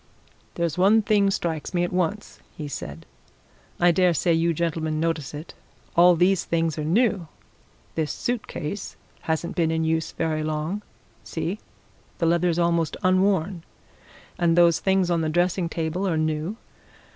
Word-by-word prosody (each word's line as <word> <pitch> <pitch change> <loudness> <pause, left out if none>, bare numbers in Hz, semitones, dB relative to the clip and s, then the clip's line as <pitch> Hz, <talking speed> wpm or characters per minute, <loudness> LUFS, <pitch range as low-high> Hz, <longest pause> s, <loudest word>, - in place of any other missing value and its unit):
"There's 170 -1 -1
one 210 +4 +5
thing 205 -2 +3
strikes 165 -3 -2
me 175 - +2
at 175 - -2
once," 185 +3 -2 0.2
he 150 - -5
said. 80 - -7 0.7
"I 175 0 +5
dare 180 0 +3
say 170 +4 +2
you 165 +1 +2
gentlemen 160 -1 -1
notice 160 -4 -1
it. 150 +3 -8 0.4
All 175 +1 +7
these 180 +2 +3
things 165 -2 0
are - - -2
new! 185 +1 +1 0.7
This 155 -2 -1
suit 245 -2 -3
case 180 +7 -5 0.3
hasn't 160 +2 -1
been 165 -2 +2
in 160 0 0
use 160 0 0
very 160 -2 -1
long 155 +6 -2 0.4
see, 175 +5 -4 0.6
the 170 - 0
leather's 170 0 +2
almost 170 -2 +1
unworn 185 -1 +2 0.8
and 170 -1 +3
those 170 -1 +5
things 190 -2 +2
on 170 -1 +2
the 160 - 0
dressing 175 +1 +1
table 165 +4 -2
are 165 -4 0
new. 155 +6 -1
170 Hz, 155 wpm, -24 LUFS, 160-185 Hz, 0.8 s, All